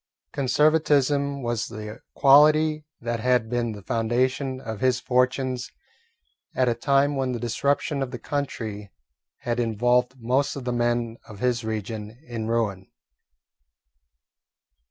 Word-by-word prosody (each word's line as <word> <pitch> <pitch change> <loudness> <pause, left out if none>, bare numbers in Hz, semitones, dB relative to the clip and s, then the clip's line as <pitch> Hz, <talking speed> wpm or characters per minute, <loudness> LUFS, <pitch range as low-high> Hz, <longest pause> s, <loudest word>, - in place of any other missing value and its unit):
Conservatism 140 -1 +2
was 120 -2 -1
the 105 +2 -8 0.2
quality 150 +2 +5 0.2
that 120 0 -2
had 125 -1 +1
been 120 -1 0
the 100 -2 -10
foundation 130 +4 0
of 110 -5 -6
his 130 0 +2
fortunes 125 0 0 0.9
at 130 - +2
a 120 - +3
time 140 +4 +2
when 130 -2 -1
the 120 - -3
disruption 140 +4 0
of 135 - -2
the 125 - -6
country 115 -6 -4 0.5
had 120 -2 -2
involved 125 +3 +1
most 130 +4 0
of 140 - -6
the 125 0 -2
men 120 -1 0
of 105 - -11
his 120 +1 0
region 110 0 -5
in 115 -2 -4
ruin. 105 -5 -1
125 Hz, 130 wpm, -25 LUFS, 115-135 Hz, 0.9 s, quality